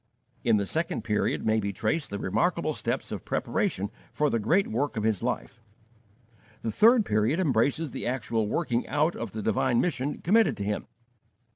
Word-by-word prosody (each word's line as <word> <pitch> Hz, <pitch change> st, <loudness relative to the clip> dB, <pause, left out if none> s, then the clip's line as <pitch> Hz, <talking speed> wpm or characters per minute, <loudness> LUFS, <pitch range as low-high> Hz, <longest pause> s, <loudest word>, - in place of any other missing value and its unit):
In -, -, +4 dB
the 100 Hz, -, 0 dB
second 160 Hz, -, -1 dB
period 105 Hz, -1 st, 0 dB
may 110 Hz, 0 st, +3 dB
be 100 Hz, -1 st, -2 dB
traced 150 Hz, -, -1 dB
the 100 Hz, -, -4 dB
remarkable 95 Hz, -, 0 dB
steps -, -, -3 dB
of -, -, -5 dB
preparation 100 Hz, +2 st, -1 dB, 0.2 s
for 150 Hz, 0 st, +1 dB
the 115 Hz, -, +1 dB
great 170 Hz, -, +3 dB
work 130 Hz, +3 st, -2 dB
of 105 Hz, -, -1 dB
his 110 Hz, -3 st, +1 dB
life. 115 Hz, -, -3 dB, 1.0 s
The 115 Hz, -, -1 dB
third 225 Hz, -, +5 dB
period 110 Hz, -, +1 dB
embraces 140 Hz, 0 st, +1 dB
the -, -, -4 dB
actual 115 Hz, -3 st, -1 dB
working 120 Hz, -2 st, -1 dB
out 155 Hz, +4 st, +1 dB
of 115 Hz, -3 st, -5 dB
the 110 Hz, -1 st, -4 dB
divine 120 Hz, +3 st, +2 dB
mission 145 Hz, -5 st, -1 dB
committed 195 Hz, -, +3 dB
to 100 Hz, -, -3 dB
him. 105 Hz, +1 st, -2 dB
115 Hz, 175 wpm, -27 LUFS, 105-155 Hz, 1.0 s, third